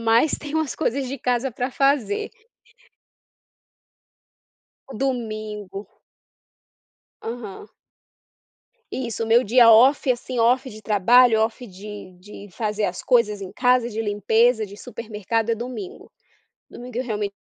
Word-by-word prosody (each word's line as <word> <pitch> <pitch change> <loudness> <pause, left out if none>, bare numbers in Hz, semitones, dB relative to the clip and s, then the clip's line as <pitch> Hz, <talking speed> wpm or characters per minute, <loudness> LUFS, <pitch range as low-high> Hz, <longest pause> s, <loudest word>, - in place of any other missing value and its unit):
mais 230 +6 +3
tenho 300 +1 -4
umas 310 -5 -2
coisas 275 -3 -1
de 275 - -5
casa 250 0 -1
pra 250 +3 -3
fazer. 270 -7 0 2.6
O - - -11
domingo. 215 -6 -4 1.4
Aham. 230 - -7 1.2
Isso, 235 -3 -3
o - - -6
meu 230 +3 +5
dia 235 +1 +6
off, 260 +5 +5
assim, 250 0 -3
off 250 +3 +2
de 215 -2 -11
trabalho, 220 +3 +4
off 230 +3 -2
de 200 -1 -10
de 205 +1 -12
fazer 210 +2 -2
as 180 -2 -3
coisas 210 -5 +2
em 190 -2 -7
casa, 250 +1 +2
de 220 -1 -4
limpeza, 220 +2 +2
de 200 +1 -12
supermercado, 225 -1 -3
é - - +2
domingo. 255 - -8 0.6
Domingo 245 -1 -9
eu 255 - -1
realmen 210 -3 -3
230 Hz, 125 wpm, -22 LUFS, 210-250 Hz, 2.6 s, dia